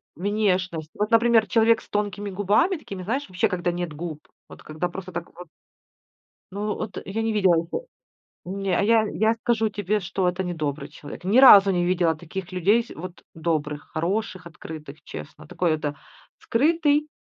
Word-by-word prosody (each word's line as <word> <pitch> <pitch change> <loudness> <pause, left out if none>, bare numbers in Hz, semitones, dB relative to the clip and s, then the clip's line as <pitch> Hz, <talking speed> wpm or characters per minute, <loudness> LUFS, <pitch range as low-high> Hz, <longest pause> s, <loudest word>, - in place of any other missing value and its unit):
внешность. 185 -4 -1
Вот, 210 +2 -1
например, 230 -1 +5
человек 225 0 +3
с - - -19
тонкими 205 -1 -2
губами 205 - +2
такими, 195 -10 -8
знаешь, 265 +9 -2
вообще 185 +4 +1
когда 175 -2 -1
нет 175 -3 -4
губ. 155 -1 -7 0.2
Вот - - -13
когда 155 +3 -3
просто 185 +1 -8
так 170 0 -5
вот 175 0 -10 1.1
Ну, 210 +1 -2
от 220 -2 -5
я 220 +4 -3
не 225 0 0
видела 190 -4 +4
ниче 170 - -2 0.6
Не 190 0 -2
а - - +2
я 220 0 +4
я 220 +2 +2
скажу 225 -1 0
тебе, 205 +1 -1
что 185 0 -1
это 180 +2 -1
недобрый 155 -5 -3
человек. 150 +4 -11
Ни 210 +7 +3
разу 200 -7 +9
не 175 -1 +1
видела 175 -2 +2
таких 175 +3 -7
людей 205 +6 +3
с - - -18
вот 180 +2 -9
добрых, 155 -2 -2
хороших, 185 +1 -2
открытых, 155 -2 -10
честно. 150 0 -9
Такой 170 +1 0
это 145 -2 -2 0.4
скрытый 300 +3 +2
185 Hz, 170 wpm, -24 LUFS, 170-215 Hz, 1.1 s, разу